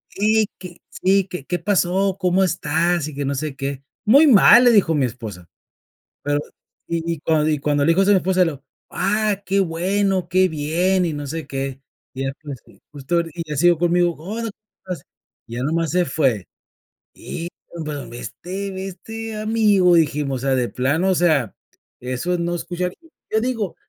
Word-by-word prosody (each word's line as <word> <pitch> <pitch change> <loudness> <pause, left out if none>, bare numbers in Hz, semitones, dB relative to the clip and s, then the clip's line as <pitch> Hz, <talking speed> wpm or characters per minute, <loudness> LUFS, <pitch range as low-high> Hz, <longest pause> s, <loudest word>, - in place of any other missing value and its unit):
"Y 215 +1 +2
que, 180 -2 -10
sí 195 0 +1
que, 180 -7 -7
¿qué 175 +3 -2
pasó? 190 +1 +1
¿Cómo 185 +1 +2
estás?", 170 -1 0
y - - -10
que 140 0 -3
no 140 +1 -1
sé 150 0 -4
qué. 140 -1 -4 0.2
"Muy 275 +9 +7
mal 240 0 +8
le 245 - +7
dijo 190 -7 +4
mi 140 -3 +2
esposa", 110 -8 -7 0.8
pero 145 0 0 0.5
y 170 -1 -1
y 160 - -10
cuan 155 0 +1
y 150 - +1
cuando 145 0 +1
le - - +1
dijo 175 +4 +4
eso 195 - +3
mi 190 - +5
esposa, 185 0 +2
le 165 - -1
dijo: 140 0 -13 0.3
"Ah 210 -1 0
que 195 +1 +1
bueno 190 +1 0
que 185 +1 +3
bien 170 +5 +1
y 160 - -2
no 145 0 -5
sé 160 +3 -5
qué". 135 0 -4 0.3
Y 130 - -6
ya 135 - -1
después 140 -2 -8
que - - -21
justo 145 +4 -1
y 170 - -4
ya 150 - -3
siguió 175 +2 +4
conmigo: 175 0 +2
"Hola 220 +7 -4
¿cómo - - -16 0.4
estás?", - - -14 0.4
ya 120 +2 -5
nomás 165 +2 0
se 180 0 +3
fue. 125 - 0 0.7
Y 170 +1 -6 0.4
pero, 145 -5 -5
ve 120 +1 -9
este 195 +7 -6
ve 190 0 -5
este 225 +4 -7
amigo 210 -5 +3
dijimos, 145 -5 +1
o - - -1
sea, 135 - +3
de 125 -2 +1
plano, 145 +9 0
o 190 - +3
sea, 155 - +2 0.5
eso 130 +9 -2
no 170 0 -1
escucha 175 +1 -3
y 330 - -21 0.2
yo 220 - +4
digo, 230 -6 -2
170 Hz, 195 wpm, -21 LUFS, 145-190 Hz, 0.8 s, mal